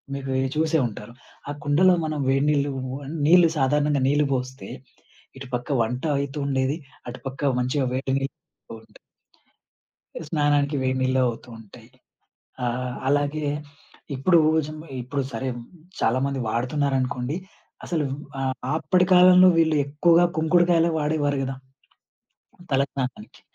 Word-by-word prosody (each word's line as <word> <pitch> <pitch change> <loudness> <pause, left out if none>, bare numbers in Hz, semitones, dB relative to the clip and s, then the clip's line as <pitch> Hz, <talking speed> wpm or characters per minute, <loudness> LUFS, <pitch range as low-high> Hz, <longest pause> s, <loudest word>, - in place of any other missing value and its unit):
మీకు 135 -1 -5 0.2
చూసే 160 +1 +2
ఉంటారు. 105 +1 -10 0.4
ఆ - - -2
కుండలో 175 +6 +4
మనం 155 -1 -3
వేడినీళ్లు, 140 +1 +2 0.6
నీళ్లు 170 0 +6
సాధారణంగా 145 +1 +1
నీళ్లు 145 0 +2
పోస్తే. 130 +1 -4 0.7
ఇటుపక్క 125 +1 -5
వంటాయితుండేది. 140 +2 -1 0.3
అటుపక్క 135 +2 -3
మంచిగా 130 +2 0
వేడి 130 +1 -2
నీళ్ళు 135 0 -5
గూడా 115 - -13
ఉంటాయి. - - -20 1.2
అ - - -11
స్నానానికి 145 -2 +1
వేడి 130 0 0
నీళ్లు 130 0 +1
అవుతూ 120 +1 -5
ఉంటాయి. 110 +1 -15 0.8
ఆహ్, 125 +1 -3
అలాగే 145 +1 0 0.7
ఇప్పుడు 170 +6 +4 0.3
జ - - -9 0.3
ఇప్పుడు, 135 +3 -3
సరే 130 +3 -3 0.5
చాలా 115 +3 +2
మంది 140 -1 -3
వాడుతున్నారనుకోండి. 130 +2 -1 0.5
అసలు 160 -4 -1 0.3
ఆహ్, 130 -1 -1 0.2
అప్పడి 180 +2 +2
కాలంలో 180 0 +7
వీళ్ళు 160 -1 +3
ఎక్కువగా 170 +4 +4
కుంకుడుకాయలే 170 +1 +3
వాడేవారు 150 -2 0
గదా! 135 0 -4 1.2
తల 135 - +3
స్నానానికి. 125 -5 -6
140 Hz, 115 wpm, -24 LUFS, 130-155 Hz, 1.2 s, కాలంలో